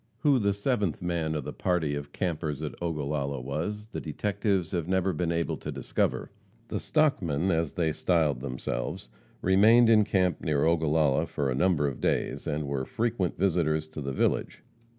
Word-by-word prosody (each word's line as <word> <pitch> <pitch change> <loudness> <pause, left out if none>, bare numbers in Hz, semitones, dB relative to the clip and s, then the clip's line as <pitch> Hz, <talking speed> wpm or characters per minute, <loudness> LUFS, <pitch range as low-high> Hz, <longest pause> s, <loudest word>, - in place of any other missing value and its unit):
Who 145 -4 +4
the 100 -2 +1
seventh 100 - -1
man 85 -3 -1
of 75 - -2
the - - -6
party 85 -5 0
of 70 0 -5
"campers 80 -5 -3
at - - -4
Ogallala" 70 -4 -2
was, 85 - -4
the - - -5
detectives 100 +2 -1
have 85 -3 -2
never 95 0 +1
been 85 +1 -1
able 85 0 -1
to - - -6
discover. - - -1 0.4
The - - -2
"stockmen," 95 - +1
as 80 -2 0
they 80 -2 +1
styled 80 -6 +1
themselves, 65 -2 -4 0.3
remained 110 +5 +6
in 110 -1 +6
camp 95 -3 +1
near 75 -3 +1
Ogallala 80 -4 +2
for 70 -2 -1
a - - 0
number 75 -1 +2
of 70 - -5
days, - - -1
and 75 0 -1
were 70 -1 -2
frequent 110 - -1
visitors 80 -5 +1
to 80 -1 -7
the 70 -1 -3
village. 65 - -1
85 Hz, 170 wpm, -28 LUFS, 75-95 Hz, 0.4 s, remained